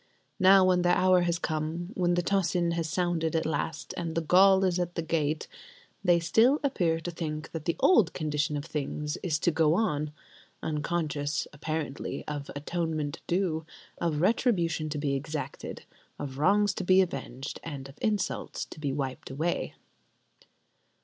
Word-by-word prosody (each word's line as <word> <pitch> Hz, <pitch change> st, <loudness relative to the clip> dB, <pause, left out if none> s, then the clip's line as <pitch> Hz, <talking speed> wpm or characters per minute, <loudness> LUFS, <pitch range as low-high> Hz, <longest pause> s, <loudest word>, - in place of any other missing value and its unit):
Now, 190 Hz, 0 st, +7 dB
when 180 Hz, -1 st, +3 dB
their 175 Hz, 0 st, +3 dB
hour 185 Hz, -1 st, +4 dB
has 170 Hz, -1 st, +1 dB
come, 160 Hz, +2 st, -3 dB
when 175 Hz, -1 st, +1 dB
the 175 Hz, -, +1 dB
tocsin 180 Hz, -2 st, +1 dB
has 165 Hz, -1 st, -2 dB
sounded 170 Hz, -3 st, 0 dB
at 160 Hz, -, +1 dB
last, 155 Hz, 0 st, -3 dB
and 165 Hz, -2 st, -4 dB
the 165 Hz, -, +1 dB
Gaul 190 Hz, +4 st, +5 dB
is 180 Hz, -1 st, +1 dB
at 175 Hz, 0 st, -2 dB
the 165 Hz, -, -1 dB
gate, 155 Hz, -1 st, -1 dB, 0.6 s
they 175 Hz, -3 st, +4 dB
still 225 Hz, -, +4 dB
appear 175 Hz, -12 st, +1 dB
to 175 Hz, +2 st, -5 dB
think 155 Hz, -2 st, -5 dB
that 165 Hz, -2 st, -6 dB
the 170 Hz, -, 0 dB
old 220 Hz, -, +5 dB
condition 150 Hz, 0 st, -1 dB
of 145 Hz, -, -5 dB
things 150 Hz, -1 st, -3 dB
is 160 Hz, -4 st, 0 dB
to 170 Hz, -, +1 dB
go 160 Hz, 0 st, +3 dB
on; 150 Hz, -8 st, 0 dB, 0.5 s
unconscious, 150 Hz, -1 st, -1 dB
apparently, 150 Hz, -1 st, -4 dB
of 145 Hz, -2 st, -5 dB
atonement 155 Hz, -1 st, -2 dB
due, 170 Hz, -3 st, 0 dB, 0.4 s
of 155 Hz, -3 st, 0 dB
retribution 175 Hz, -7 st, +1 dB
to 150 Hz, -, -3 dB
be 145 Hz, -1 st, 0 dB
exacted, 150 Hz, +2 st, -5 dB, 0.3 s
of 135 Hz, -2 st, -6 dB
wrongs 205 Hz, +5 st, +4 dB
to 190 Hz, -, -4 dB
be 185 Hz, +1 st, +5 dB
avenged 135 Hz, -6 st, -4 dB
and 140 Hz, -4 st, -6 dB
of 135 Hz, -, -15 dB
insults 210 Hz, -4 st, -1 dB
to -, -, -12 dB
be 145 Hz, -2 st, -1 dB
wiped 135 Hz, -2 st, -4 dB
away! 160 Hz, +6 st, -2 dB
165 Hz, 165 wpm, -29 LUFS, 150-180 Hz, 0.6 s, Now